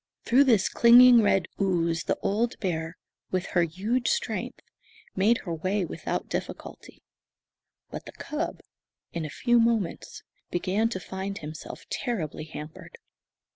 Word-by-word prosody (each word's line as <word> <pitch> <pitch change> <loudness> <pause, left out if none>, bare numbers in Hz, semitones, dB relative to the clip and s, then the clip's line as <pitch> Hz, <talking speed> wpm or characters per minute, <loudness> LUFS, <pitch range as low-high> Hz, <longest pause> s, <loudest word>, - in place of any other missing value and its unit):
Through 265 +4 +5
this 225 -7 +4
clinging 240 0 +7
red 195 -4 +2 0.2
ooze 170 -3 0
the - - 0
old 225 +4 0
bear, 165 -3 -3 0.3
with 185 -1 -1
her 175 - +4
huge 200 +10 -1
strength, 475 0 -2 0.6
made 215 +5 +3
her 170 - -3
way 185 +4 -1
without - - -4
difficulty; - - -7 0.9
but - - -7
the - - -8
cub, - - -4 0.5
in 165 -2 -3
a - - -5
few 240 - +2
moments, 230 -5 -1 0.3
began 195 +6 0
to 190 - -4
find 190 +2 -5
himself 155 0 -8
terribly 185 - -3
hampered. 155 0 -10
190 Hz, 135 wpm, -27 LUFS, 170-235 Hz, 0.9 s, clinging